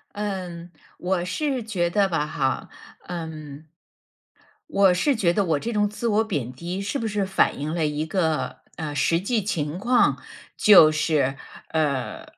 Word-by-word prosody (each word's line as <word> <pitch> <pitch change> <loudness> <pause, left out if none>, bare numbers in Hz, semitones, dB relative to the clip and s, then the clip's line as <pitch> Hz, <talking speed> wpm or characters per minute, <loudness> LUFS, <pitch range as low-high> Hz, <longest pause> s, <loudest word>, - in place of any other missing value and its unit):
嗯。 185 -4 -5 0.3
我 180 -1 -1
是 265 - -2
觉 185 -6 -1
得 200 +2 +2
吧 160 -4 0
哈， 135 -3 -2 0.4
嗯 155 -4 -7 1.0
我 195 - +4
是 275 +11 +2
觉 180 -6 +2
得 200 +2 +1
我 160 -5 +1
这 235 +11 -4
种 210 -1 +2
自 215 +3 -3
我 220 0 +2
贬 145 - -3
低 175 +8 -5
是 205 +8 -2
不 230 - -2
是 210 -2 -1
反 190 -6 +1
映 155 +3 -3
了 165 -3 +1
一 150 +1 -2
个， 160 -2 -1 0.2
呃 155 -2 -4
实 165 +3 +2
际 215 +3 0
情 160 -5 -2
况。 240 +4 +3 0.4
就 175 -7 +8
是， 150 -3 +1 0.3
呃， 150 -5 -1
175 Hz, 170 characters per minute, -24 LUFS, 155-205 Hz, 1.0 s, 就